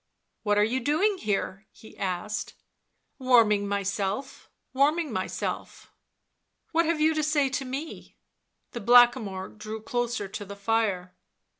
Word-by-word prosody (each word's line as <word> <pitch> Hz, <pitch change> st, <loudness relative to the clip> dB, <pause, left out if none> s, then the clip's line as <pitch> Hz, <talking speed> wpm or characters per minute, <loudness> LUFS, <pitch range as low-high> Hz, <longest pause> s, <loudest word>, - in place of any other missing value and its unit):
" -, -, -52 dB
What 205 Hz, -1 st, +1 dB
are 205 Hz, -, +5 dB
you 240 Hz, +5 st, 0 dB
doing 340 Hz, -, +1 dB
here 205 Hz, 0 st, -2 dB
V' -, -, -23 dB
he -, -, -18 dB
asked. 195 Hz, +2 st, -3 dB, 0.6 s
u 260 Hz, -, -10 dB
Warming 210 Hz, -5 st, +5 dB
myself, 200 Hz, +4 st, -3 dB, 0.2 s
warming 295 Hz, +1 st, +2 dB
myself." 185 Hz, -1 st, -4 dB
(l -, -, -38 dB, 0.8 s
What 335 Hz, +1 st, +3 dB
have 335 Hz, -1 st, +1 dB
you 315 Hz, +1 st, +4 dB
to 310 Hz, -, 0 dB
say 295 Hz, -2 st, +2 dB
to 270 Hz, +1 st, -3 dB
me 275 Hz, +5 st, -7 dB, 0.3 s
?" -, -, -51 dB
The 235 Hz, -, -6 dB
Blackamoor 240 Hz, -4 st, +4 dB
drew 215 Hz, +1 st, -7 dB
closer 240 Hz, -1 st, -2 dB
to 195 Hz, -, -6 dB
the 200 Hz, 0 st, -9 dB
fire. 200 Hz, -4 st, -1 dB
225 Hz, 155 wpm, -27 LUFS, 200-275 Hz, 0.8 s, are